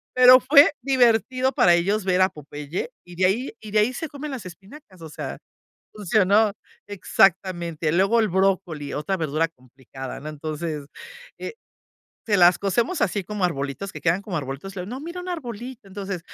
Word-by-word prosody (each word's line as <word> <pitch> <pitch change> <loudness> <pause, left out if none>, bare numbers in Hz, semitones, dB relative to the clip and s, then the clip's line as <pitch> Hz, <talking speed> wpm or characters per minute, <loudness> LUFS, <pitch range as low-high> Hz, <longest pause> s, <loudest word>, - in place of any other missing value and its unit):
pero 255 0 +9
fue 285 +3 +6
divertido 255 0 +2
para 175 - +5
ellos 195 +4 0
ver 185 0 +2
a 185 - +5
Popeye, 150 - -6
y 175 0 -12
de 185 - +2
ahí 225 +7 0
y 215 -2 -9
de 210 - +3
ahí 235 +5 +2
se 320 +3 -5
comen 290 +1 -7
las 240 -8 -6
espinacas, 190 - -13
o 160 - -9
sea, - - -6 0.6
funcionó, 210 +1 +2 0.3
exactamente. 175 -4 +1
Luego 195 +7 +3
el 220 - +2
brócoli, 185 -5 0
otra 175 +6 -2
verdura 160 0 0
complicada. 130 -1 -10
No, 150 - -7
entonces 155 0 -5 0.5
eh, - - -6 0.7
se 210 - +2
las 180 -1 +6
cocemos 235 - 0
así 195 0 0
como 210 -2 -3
arbolitos 145 +5 -4
que - - -8
quedan 175 +3 +2
como 195 -4 -5
arbolitos, 145 +7 -6
luego 180 +2 -5
no, 260 +2 -6
mira 340 +3 -7
un 365 - -8
arbolito. 245 - -7
Entonces, 195 -2 -5
195 Hz, 175 wpm, -23 LUFS, 165-230 Hz, 0.7 s, pero